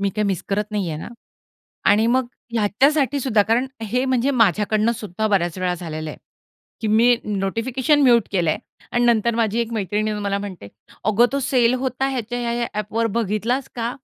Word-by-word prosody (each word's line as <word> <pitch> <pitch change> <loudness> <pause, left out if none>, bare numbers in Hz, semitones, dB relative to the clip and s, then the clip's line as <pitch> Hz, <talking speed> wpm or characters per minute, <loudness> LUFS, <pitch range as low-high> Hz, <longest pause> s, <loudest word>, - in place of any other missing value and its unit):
मी 200 - +1
काही 210 +1 -1
मिस 195 -4 -1
करत 205 +1 0
नाही 205 -4 -2
आहे 155 - -4
ना? - - -7 0.8
आणि 215 +2 +4
मग 255 +1 +2 0.3
ह्याच्यासाठी 270 +6 +2
सुद्धा 225 -5 +3
कारण 230 +5 +1 0.2
हे 245 +4 0
म्हणजे 260 0 +1
माझ्याकडनंसुद्धा 215 -2 +1
बऱ्याच 180 -4 0
वेळा 180 -1 0
झालेलं 155 -3 -6
आहे, - - -9 0.6
की 225 - -2
मी 235 +3 +5
नोटिफिकेशन 230 +8 0
म्यूट 240 -5 +4
केलंय 170 -5 +1 0.4
आणि 240 0 +2
नंतर 235 -1 +3
माझी 225 0 +1
एक 230 0 -3
मैत्रीण 210 0 -1
येऊन 210 -1 -3
मला 200 0 -1
म्हणते, 190 - -7 0.4
"अगं 215 +4 +4
तो 280 - 0
सेल 250 -2 +2
होता 265 +1 -1
ह्याच्या 245 -2 -3
ह्या-ह्या 235 0 -1
ॲपवर 215 +2 -1
बघितलास 230 +5 -1
का?" 235 -1 -2
225 Hz, 175 wpm, -21 LUFS, 205-245 Hz, 0.8 s, मी